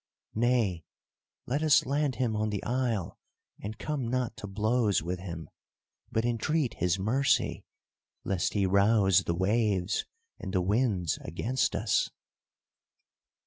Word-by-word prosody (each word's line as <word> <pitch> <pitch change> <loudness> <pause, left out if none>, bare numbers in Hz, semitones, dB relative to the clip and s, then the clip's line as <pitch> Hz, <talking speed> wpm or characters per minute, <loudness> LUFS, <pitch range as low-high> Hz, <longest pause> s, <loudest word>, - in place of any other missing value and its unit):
Nay, 110 -7 +1 0.6
let 140 +5 -1
us 155 -1 +5
land 140 -1 0
him 120 -4 0
on 110 0 0
the 105 -2 -3
isle 120 -7 -1 0.4
and 105 +1 -6
come 145 -5 -3
not 125 -1 -1
to 105 - -6
blows 110 -1 +1
with 90 +2 -3
him, 85 -3 -7 0.6
but 110 +1 0
entreat 120 +4 0
his 90 +1 0
mercy, 130 +8 +1 0.6
lest 95 -3 -1
he 100 -2 +2
rouse 100 -1 +4
the 85 - 0
waves 100 0 +1 0.3
and 95 - -6
the 90 - +3
winds 100 - +1
against 115 +11 -1
us." - - +1
110 Hz, 130 wpm, -29 LUFS, 95-125 Hz, 0.6 s, us